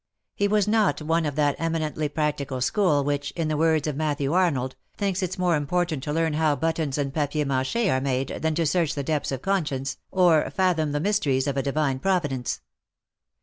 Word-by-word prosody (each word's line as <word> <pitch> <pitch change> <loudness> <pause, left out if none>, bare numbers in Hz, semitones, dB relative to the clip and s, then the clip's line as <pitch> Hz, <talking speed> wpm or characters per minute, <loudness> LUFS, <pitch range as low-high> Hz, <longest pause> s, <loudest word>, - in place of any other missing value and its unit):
He 200 - +1
was 210 -1 +2
not 215 -1 +2
one 165 +1 +1
of 145 - -4
that 145 -2 +2
eminently 155 -2 -1
practical 145 -3 -2
school 150 - +2
which, 145 0 -1
in 165 -2 -1
the 155 - 0
words 160 -1 +2
of 150 -3 -2
Matthew 145 -1 -1
Arnold, 145 -8 +1 0.2
thinks 200 -2 -1
it 185 -1 -3
more 180 -2 +2
important 155 0 -1
to 150 - -4
learn 160 0 +1
how 155 -1 +2
buttons 160 -1 -1
and 140 -2 -2
papier 150 0 0
rnclc 135 - 0
he - - +2
are 130 -7 +1
made 135 -1 -1
than 160 -1 0
to 165 0 +1
search 165 0 +1
the 140 - -2
depths 150 0 -1
of 135 -1 -4
conscience, 145 -9 -1
or 175 -4 +3
fathom 175 -5 +1
the 145 - -1
mysteries 150 -8 +1
of 140 -2 -1
a 135 - +1
Divine 140 -1 0
Providence. 145 -9 -1
155 Hz, 200 wpm, -25 LUFS, 140-170 Hz, 0.2 s, or